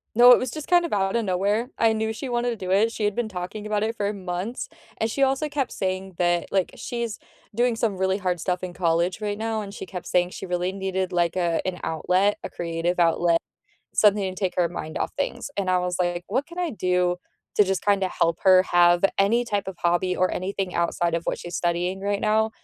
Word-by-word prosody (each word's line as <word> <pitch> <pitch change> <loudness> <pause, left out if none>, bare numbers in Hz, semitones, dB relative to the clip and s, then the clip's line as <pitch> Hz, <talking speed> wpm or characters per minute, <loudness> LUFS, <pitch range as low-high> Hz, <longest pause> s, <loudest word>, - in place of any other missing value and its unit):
No, 245 +1 +9
it - - +9
was 255 -2 -3
just 305 -2 -7
kind 350 -1 +4
of 330 - -4
out 195 +1 +1
of 230 -2 +1
nowhere. 200 +6 0
I 225 -1 +4
knew 220 0 -1
she 255 +3 -6
wanted 240 0 0
to - - -3
do 185 -3 -6
it 215 +4 +3
she 220 - -4
had 205 -1 +1
been 235 -2 -1
talking 185 +3 -6
about 210 -1 0
it 225 +1 -1
for 205 0 -1
months, 195 - -4 0.3
and 225 - 0
she 275 +4 +1
also 270 +3 +1
kept 280 -3 -2
saying 190 0 -3
that, 175 -1 +1
like, 190 -2 +1
she's 235 -3 -4 0.4
doing 240 -1 +2
some 220 -4 -1
really 190 +1 +1
hard 180 -2 -1
stuff 180 +1 -1
in 180 -1 -4
college 175 +3 0
right 205 -1 -2
now, 220 0 -2
and 200 -1 -8
she 190 - -7
kept 180 -2 -7
saying 180 0 +2
she 190 - -7
really 180 +1 -1
needed 190 -1 -2
like 175 -1 +1
a 170 -2 +1
an 185 -1 -3
outlet, 180 +5 +1
a - - -4
creative 170 +1 -2
outlet, 170 0 +3 0.6
something 200 -3 +3
to - - -9
take 190 -3 -1
her 175 -2 +3
mind 160 -2 -5
off - - -2
things, 285 - -3
and 190 -2 0
I 185 - +3
was 180 0 -1
like, 175 0 -1
"What 260 +7 0
can 340 +2 -11
I 350 -3 0
do, 180 -3 +1 0.4
to 210 - +6
just 190 -2 -1
kinda 200 -2 +2
help 165 -2 0
her 185 -1 +6
have 175 +1 +5
any 230 +5 +3
type 205 -4 -2
of 185 - -6
hobby 175 +1 +1
or 185 0 +1
anything 190 0 -3
outside 170 0 0
of 170 - -1
what - - -2
she's 175 -1 -8
studying 175 +2 -1
right 200 0 -1
now?" 220 +1 +2
190 Hz, 235 wpm, -24 LUFS, 180-220 Hz, 0.6 s, No